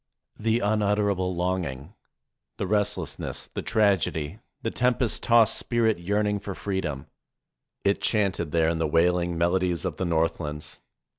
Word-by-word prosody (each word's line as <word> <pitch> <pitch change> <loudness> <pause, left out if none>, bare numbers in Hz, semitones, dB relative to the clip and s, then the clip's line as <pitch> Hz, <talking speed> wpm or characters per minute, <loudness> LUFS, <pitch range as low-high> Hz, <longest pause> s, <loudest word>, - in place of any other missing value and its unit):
The 115 +2 +1
unutterable 100 -3 +1
longing, 90 -3 -2 0.6
the - - -2
restlessness, 100 -6 -1
the - - -3
tragedy, 100 -5 +1 0.2
the 115 - -1
tempest 125 -1 +1
tossed 115 -2 +5
spirit 115 -5 +1
yearn 100 +4 0
ing 105 0 0
for 100 -1 -6
freedom; 90 -9 -3 0.8
it 100 0 +2
chanted 100 -7 0
there 80 0 +2
in 85 -1 -1
the 80 - +1
wailing 85 +2 +2
melo 85 +2 +2
dies 90 -1 -1
of 90 -5 -3
the 95 - -1
Northlands. 80 -3 -2
95 Hz, 140 wpm, -26 LUFS, 85-105 Hz, 0.8 s, tossed